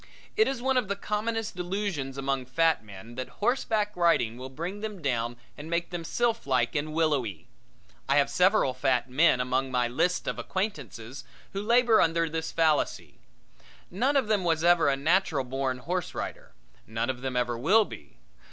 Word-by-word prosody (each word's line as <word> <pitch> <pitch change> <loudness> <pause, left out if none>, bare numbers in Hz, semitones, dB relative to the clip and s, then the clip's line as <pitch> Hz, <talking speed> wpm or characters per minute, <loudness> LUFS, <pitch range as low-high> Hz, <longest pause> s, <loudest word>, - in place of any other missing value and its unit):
It 435 - +4
is 265 -3 -3
one 265 0 +2
of 250 - +1
the 200 - -1
commonest 215 +1 -2
delusions 180 -7 -3
among 135 -2 -2
fat 160 -1 +2
men 105 +2 -11
that 130 +1 -5
horseback 215 -2 0
riding 170 -10 +2
will 130 +2 -8
bring 170 +9 -5
them 210 -2 -5
down 120 -5 -1 0.2
and 150 +2 -9
make 170 +1 -1
them 175 -1 -4
sylphlike 155 - 0
and 155 +1 -2
willowy. 140 - 0 0.6
I 140 - +4
have 140 - +4
several 185 -7 +3
fat 130 -1 0
men 150 -1 +4
among 130 +1 0
my 125 -1 +1
lists 175 +9 0
of - - -2
acquaintances 140 - -4 0.3
who 195 - -2
labor 235 +1 +4
under 165 0 +2
this 160 0 -3
fallacy. 160 -2 0 0.7
None 255 +10 +1
of 260 -5 +1
them 210 -3 +1
was 165 -2 +1
ever 170 -3 +5
a 135 - +1
natural 160 -1 +2
born 130 0 -2
horseback 175 +7 -3
rider; - - -6 0.3
none 115 +3 -1
of 125 -1 -10
them 130 -1 -3
ever 120 -1 0
will 190 - +4
be. 70 - -12
160 Hz, 175 wpm, -28 LUFS, 130-200 Hz, 0.7 s, ever